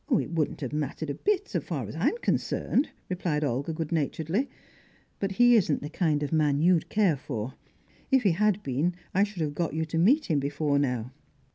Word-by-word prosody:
"It 225 Hz, -, +1 dB
wouldn't 160 Hz, -3 st, -1 dB
have 135 Hz, 0 st, -4 dB
mattered 150 Hz, 0 st, -2 dB
a -, -, -2 dB
bit, 405 Hz, -, 0 dB
so -, -, -1 dB
far -, -, -4 dB
as -, -, -8 dB
I'm -, -, +1 dB
concerned," 285 Hz, -, +1 dB, 0.2 s
replied 170 Hz, -5 st, -1 dB
Olga 140 Hz, +3 st, -1 dB
good 160 Hz, -1 st, -4 dB
naturedly. 165 Hz, -, -1 dB, 0.7 s
"But 195 Hz, -1 st, -1 dB
he 245 Hz, +4 st, +6 dB
isn't 170 Hz, -11 st, +2 dB
the 150 Hz, -, -6 dB
kind 155 Hz, -4 st, +1 dB
of 145 Hz, -, -3 dB
man 150 Hz, -3 st, +2 dB
you'd 170 Hz, 0 st, +3 dB
care 200 Hz, -7 st, +3 dB
for. 130 Hz, -3 st, -5 dB, 0.6 s
If 265 Hz, -2 st, +4 dB
he 200 Hz, -, +4 dB
had 210 Hz, +3 st, +1 dB
been, 145 Hz, +7 st, 0 dB, 0.2 s
I 195 Hz, -, +3 dB
should 200 Hz, -5 st, -2 dB
have 145 Hz, -1 st, -2 dB
got 165 Hz, 0 st, -2 dB
you 160 Hz, 0 st, 0 dB
to 160 Hz, +1 st, -2 dB
meet 275 Hz, -, +4 dB
him 155 Hz, -5 st, +1 dB
before 140 Hz, +1 st, 0 dB
now." 125 Hz, -3 st, -1 dB
160 Hz, 205 wpm, -27 LUFS, 145-195 Hz, 0.7 s, he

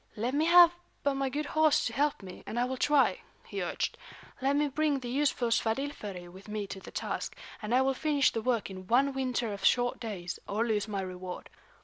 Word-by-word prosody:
"Let 235 Hz, +4 st, -2 dB
me 300 Hz, +3 st, +2 dB
have 345 Hz, 0 st, +8 dB, 0.3 s
but 280 Hz, -, +2 dB
my 270 Hz, 0 st, -1 dB
good 295 Hz, +3 st, -2 dB
horse 310 Hz, 0 st, +3 dB
to -, -, -2 dB
help 290 Hz, -5 st, 0 dB
me, 185 Hz, -1 st, -9 dB
and 240 Hz, -, -2 dB
I 245 Hz, -, +3 dB
will 260 Hz, +1 st, -3 dB
try," 290 Hz, +2 st, +3 dB, 0.2 s
he -, -, -5 dB
urged. -, -, -2 dB, 0.4 s
"Let 275 Hz, +2 st, +2 dB
me 295 Hz, +1 st, +2 dB
bring 295 Hz, +1 st, +1 dB
the 245 Hz, -2 st, -6 dB
useful 270 Hz, -3 st, +1 dB
Svadilföri 220 Hz, -6 st, -2 dB
with 190 Hz, +3 st, -13 dB
me 210 Hz, -1 st, -3 dB
to 190 Hz, -, -9 dB
the -, -, -11 dB
task, -, -, -4 dB, 0.3 s
and 210 Hz, 0 st, -4 dB
I 260 Hz, -, +5 dB
will 270 Hz, 0 st, +2 dB
finish 290 Hz, 0 st, +2 dB
the 225 Hz, -, -2 dB
work 230 Hz, -4 st, 0 dB
in 185 Hz, -1 st, -9 dB
one 270 Hz, +5 st, +3 dB
winter 250 Hz, -4 st, -1 dB
of 200 Hz, -1 st, -8 dB
short 245 Hz, 0 st, +3 dB
days, 190 Hz, -7 st, -5 dB
or 215 Hz, +3 st, 0 dB
lose 215 Hz, -2 st, 0 dB
my 200 Hz, -2 st, -2 dB
reward. 185 Hz, -1 st, -7 dB
245 Hz, 220 wpm, -30 LUFS, 210-280 Hz, 0.4 s, have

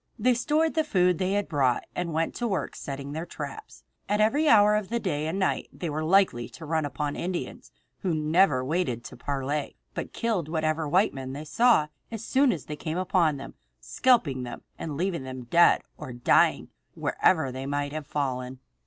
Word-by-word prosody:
They 250 Hz, +3 st, +3 dB
stored 305 Hz, +7 st, +1 dB
the 315 Hz, -, +2 dB
food 180 Hz, -, +2 dB
they 190 Hz, +1 st, 0 dB
had 205 Hz, 0 st, 0 dB
brought 135 Hz, -6 st, +1 dB
and 175 Hz, -1 st, -2 dB
went 160 Hz, +1 st, 0 dB
to 240 Hz, -, -1 dB
work 195 Hz, -4 st, -2 dB
setting 140 Hz, 0 st, -6 dB
their 160 Hz, +3 st, -5 dB
traps. 140 Hz, -, -8 dB, 0.3 s
At 205 Hz, +1 st, +1 dB
every 285 Hz, +9 st, +3 dB
hour 210 Hz, -2 st, +6 dB
of 210 Hz, -3 st, -2 dB
the 235 Hz, +1 st, 0 dB
day 155 Hz, -8 st, -2 dB
and 165 Hz, +4 st, -2 dB
night 190 Hz, -, 0 dB
they 170 Hz, -3 st, -5 dB
were 155 Hz, +2 st, -2 dB
likely 160 Hz, -, +3 dB
to 165 Hz, -, -10 dB
run 160 Hz, 0 st, 0 dB
upon 145 Hz, +1 st, -3 dB
Indians, 180 Hz, 0 st, -5 dB, 0.3 s
who 180 Hz, -4 st, -1 dB
never 155 Hz, -3 st, +3 dB
waited 135 Hz, -6 st, -1 dB
to -, -, -9 dB
parley, 140 Hz, +1 st, -3 dB, 0.2 s
but -, -, -5 dB
killed 210 Hz, -9 st, -1 dB
whatever 155 Hz, -1 st, -1 dB
white 185 Hz, +7 st, +3 dB
men 130 Hz, -1 st, -6 dB
they 145 Hz, +3 st, -6 dB
saw 235 Hz, -1 st, +4 dB, 0.2 s
as 225 Hz, -1 st, -6 dB
soon 270 Hz, -1 st, +3 dB
as 165 Hz, -, -4 dB
they 150 Hz, -, -5 dB
came 160 Hz, +2 st, -4 dB
upon 175 Hz, -5 st, +2 dB
them, 135 Hz, 0 st, -9 dB, 0.3 s
scalping 195 Hz, -, +2 dB
them 120 Hz, -1 st, -7 dB
and 150 Hz, -3 st, -5 dB
leaving 180 Hz, -2 st, -1 dB
them 130 Hz, -1 st, -7 dB
dead 170 Hz, +9 st, +4 dB
or 150 Hz, -4 st, -7 dB
dying 120 Hz, 0 st, +3 dB, 0.3 s
wherever 160 Hz, -7 st, +2 dB
they 130 Hz, +1 st, -5 dB
might 145 Hz, 0 st, -2 dB
have 155 Hz, -2 st, -5 dB
fallen. 130 Hz, -3 st, -3 dB
160 Hz, 195 wpm, -27 LUFS, 140-195 Hz, 0.3 s, hour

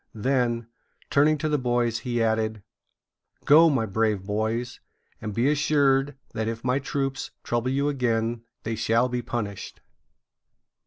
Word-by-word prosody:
Then, 120 Hz, 0 st, 0 dB, 0.5 s
turning 150 Hz, +2 st, +4 dB
to 155 Hz, -, -2 dB
the 150 Hz, -1 st, +1 dB
boys, 120 Hz, -2 st, 0 dB
he 120 Hz, -1 st, -1 dB
added: 110 Hz, -2 st, 0 dB, 0.8 s
"Go, 160 Hz, +3 st, +7 dB
my 130 Hz, -7 st, +1 dB
brave 110 Hz, -1 st, 0 dB
boys, 110 Hz, +4 st, -2 dB, 0.4 s
and 105 Hz, -, -4 dB
be 115 Hz, +6 st, +1 dB
assured 145 Hz, -2 st, +2 dB, 0.2 s
that 110 Hz, 0 st, -2 dB
if 115 Hz, 0 st, -4 dB
my 130 Hz, +2 st, +1 dB
troops 135 Hz, -1 st, -3 dB
trouble 120 Hz, +1 st, -1 dB
you 140 Hz, +2 st, +1 dB
again 120 Hz, -4 st, 0 dB, 0.2 s
they 115 Hz, -, -2 dB
shall 115 Hz, +3 st, +2 dB
be 125 Hz, 0 st, -2 dB
punished." 105 Hz, -5 st, -5 dB
120 Hz, 140 wpm, -25 LUFS, 110-135 Hz, 0.8 s, Go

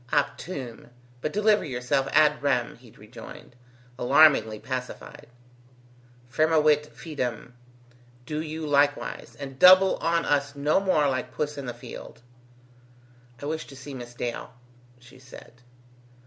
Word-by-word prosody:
"Optume; 130 Hz, -10 st, -3 dB, 0.3 s
but 155 Hz, -, -2 dB
deliver 210 Hz, +1 st, +3 dB
yourself 130 Hz, -1 st, -1 dB
ad 150 Hz, 0 st, +4 dB
rem," 130 Hz, -4 st, 0 dB
he 120 Hz, -1 st, -18 dB
rejoined, 110 Hz, +3 st, -13 dB, 0.4 s
alarmingly 135 Hz, -5 st, +5 dB
pacified. 125 Hz, +2 st, -7 dB, 1.0 s
"Firmavit 150 Hz, +2 st, +2 dB
fidem. 125 Hz, -7 st, -5 dB, 0.7 s
Do 150 Hz, +3 st, -3 dB
you 160 Hz, 0 st, -5 dB
likewise, 145 Hz, 0 st, 0 dB
and 135 Hz, -1 st, -8 dB
double 185 Hz, +1 st, +7 dB
on 165 Hz, 0 st, 0 dB
us 145 Hz, -1 st, 0 dB
no 145 Hz, +5 st, +2 dB
more 185 Hz, -7 st, +2 dB
like 130 Hz, -2 st, -2 dB
puss 150 Hz, 0 st, -2 dB
in 140 Hz, -2 st, -7 dB
the 120 Hz, -, -4 dB
field." -, -, -11 dB, 1.2 s
"I -, -, -4 dB
wish 155 Hz, +1 st, -4 dB
to 135 Hz, -, -12 dB
see 135 Hz, +2 st, -9 dB
Miss 120 Hz, -2 st, -9 dB
Dale," 120 Hz, -1 st, -5 dB, 0.5 s
she 125 Hz, +1 st, -17 dB
said. 125 Hz, -1 st, -15 dB
140 Hz, 125 wpm, -26 LUFS, 125-155 Hz, 1.2 s, double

